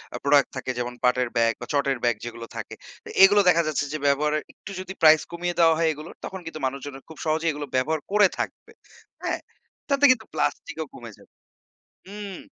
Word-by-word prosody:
আ - - -2
product 140 0 +4
থাকে। 130 0 -3
যেমন 120 0 -3
পাটের 125 -1 +2
ব্যাগ 115 0 +3
বা 120 - -4
চটের 140 -2 +1
ব্যাগ 120 -2 +3
যেগুলো 115 -1 -7
থাকে। - - -6 0.3
তো - - -11
এগুলো 205 +1 +7
দেখা 170 -1 +4
যাচ্ছে 145 -1 0
যে - - -1
ব্যবহারের 150 +2 +2
একটু 200 - -11
যদি 190 +1 -6
প্রাইস 155 -1 +7
কমিয়ে 175 0 -3
দেওয়া 165 -1 +6
হয় 165 -1 +2
এগুলোর। 155 +3 -10
তখন 190 - -6
কিন্তু 160 -1 -7
মানুষজন 140 +1 -4 0.2
খুব 160 - -11
সহজেই 160 +1 +1
এগুলো 145 0 -5
ব্যবহার 150 +5 +1
করে 205 -1 +6
থাকবে। - - -5 0.5
হ্যাঁ? - - -1 0.5
তাতে 280 0 +4
কিন্তু 225 -4 0
প্লাস্টিকও - - -2
কমে - - -10
যাবে। - - -21 0.7
হুম। 200 -1 -7
155 Hz, 190 wpm, -25 LUFS, 135-175 Hz, 0.7 s, এগুলো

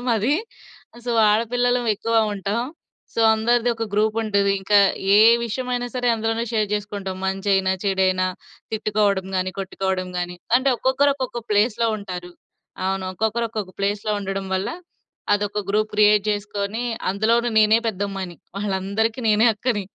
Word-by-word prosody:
మాది. 230 +3 +2 0.7
సో 245 - -2 0.2
ఆడపిల్లలం 245 +3 +1
ఎక్కువ 230 +3 -3 0.2
ఉంటాం. 205 +3 -2 0.5
సో - - 0
అందరిది 240 +2 +2
ఒక 225 - -2
గ్రూప్ 215 +1 +2
ఉంటది. 200 -2 +1
ఇంకా 205 +1 +4 0.4
ఏ - - +7 0.3
విషయమైనా 245 +1 -2
సరే 245 -1 0
అందులోనే 225 +1 -1
షేర్ 215 -2 +1
చేసుకుంటాం. 200 -2 -4
మంచైనా, 195 0 +1
చెడైనా, 185 -1 +2 0.5
తిట్టుకోవడం 205 -3 0
గానీ, 185 0 0
కొట్టుకోవడం 190 -1 -2
గానీ, 175 0 -4 0.2
అంటే 270 +1 0
ఒక్కొక్కరు 275 +3 +2
ఒక్కొక్క 255 -3 -4
ప్లేస్‌లో 215 +2 +2
ఉంటారు. 180 -3 -7 0.6
అవును. 190 0 -1
ఒక్కొక్కరు 220 +3 0
ఒక్కొక్క 210 -4 -4
ప్లేస్‌లో 205 +1 -1
ఉండడం 195 0 -4
వల్ల 190 +1 -1 0.7
అదొక 205 0 -1
గ్రూప్ 215 +1 +1
క్రియేట్ 210 -1 +4
జేసుకొని 205 +1 -3 0.3
అందులోను 230 +4 +1
నేనే 215 +1 +5
పెద్దమ్మాయిని. 195 -4 -4 0.2
వాళ్ళందరికీ 205 +4 -1
నేనే 215 +3 +5
అక్కని. 210 -5 -1
210 Hz, 130 wpm, -22 LUFS, 195-230 Hz, 0.7 s, ఏ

